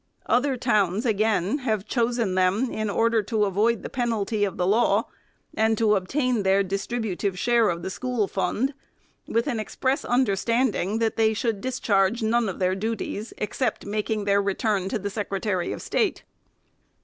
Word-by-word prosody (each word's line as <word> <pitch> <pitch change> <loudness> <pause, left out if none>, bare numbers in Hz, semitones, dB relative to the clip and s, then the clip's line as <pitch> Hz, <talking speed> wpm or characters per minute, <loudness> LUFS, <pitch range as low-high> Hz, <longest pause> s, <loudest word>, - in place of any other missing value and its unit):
Other 260 +1 +2
towns, 215 -3 +1
again, 215 - +1
have 215 -6 -1
chosen 235 -4 0
them, 190 +7 +1
in 215 -1 -2
order 230 +2 +2
to 210 +1 0
avoid 210 +2 +1
the - - -4
penalty 225 -4 -1
of 200 - -1
the 180 - +1
law, 215 +6 +3 0.5
and 220 0 +2
to 215 -1 +3
obtain 245 +5 0
their 195 0 +3
dis 195 +1 -3
tributive 205 -5 -2
share 235 +1 +3
of 170 0 -3
the 190 - -3
school 250 -2 -1
fund, 245 +8 -1 0.5
with 230 +1 0
an 245 -6 -1
express 260 +6 -1
under 245 -5 +2
standing 220 -1 0
that 225 -1 0
they 220 -1 +3
should 225 -3 -1
discharge 225 -3 +1
none 225 0 +2
of 185 - -5
their 185 0 +1
duties, 215 +1 -3
except 245 +4 -2
making 210 0 -2
their 200 0 +3
return 200 -1 0
to 225 - -1
the 205 0 -4
Secretary 195 -3 -2
of - - -6
State. 425 -4 0
215 Hz, 170 wpm, -25 LUFS, 195-235 Hz, 0.5 s, law